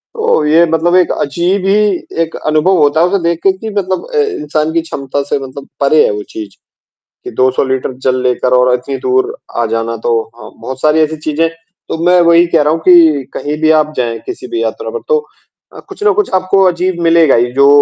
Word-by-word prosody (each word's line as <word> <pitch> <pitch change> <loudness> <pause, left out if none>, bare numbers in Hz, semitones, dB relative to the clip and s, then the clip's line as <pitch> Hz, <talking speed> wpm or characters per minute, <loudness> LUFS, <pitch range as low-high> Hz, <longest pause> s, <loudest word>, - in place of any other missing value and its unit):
तो 445 - +1
ये 160 +3 +4
मतलब 165 +2 +1
एक 185 -1 +3
अजीब 175 +6 -1
ही 195 - +3 0.5
एक 165 - -7
अनुभव 155 +5 +2
होता 150 0 +2
है 175 - +4
उसे 200 +2 0
देख 170 -1 0
के 195 - +4
कि 220 +3 -6
मतलब 190 -3 -2
अ, - - -1
इंसान 155 - -1
की 165 - +1
क्षमता 140 -3 -4
से - - 0
मतलब 135 +1 -9
परे 150 +2 +4
है - - 0
वो 105 0 -5
चीज़, 105 -3 -8 0.7
कि - - -7
200 130 +1 +1
लीटर 130 0 -2
जल 130 0 +1
लेकर 125 0 0
और 125 0 +3
इतनी 125 +2 -3
दूर 130 0 0 0.3
आ - - +1
जाना, 115 0 -2
तो 115 0 0 0.2
हाँ, 110 - -11
बहुत 130 0 -7
सारी 155 +1 +3
ऐसी 155 0 -1
चीज़ें 160 +2 +1 0.4
तो - - -3
मैं 180 0 +4
वही 170 0 +5
कह 165 -2 +2
रहा 150 +1 +2
हूँ 165 - -2
कि 165 -6 +5
कहीं 150 +1 -4
भी 155 - +4
आप 155 0 -5
जाएँ, 115 -2 -2
किसी 380 0 -7
भी 355 -1 -3
यात्रा 475 +1 -4
पर - - -10
तो 465 -1 +2 0.6
अ, - - -9
कुछ - - -8
ना 420 - +4
कुछ 415 - -8
आपको 185 +1 +2
अजीब 175 0 -2
मिलेगा 165 -3 +4
ही, 120 +1 +1
जो 140 +1 +4
155 Hz, 220 wpm, -13 LUFS, 130-180 Hz, 0.7 s, वही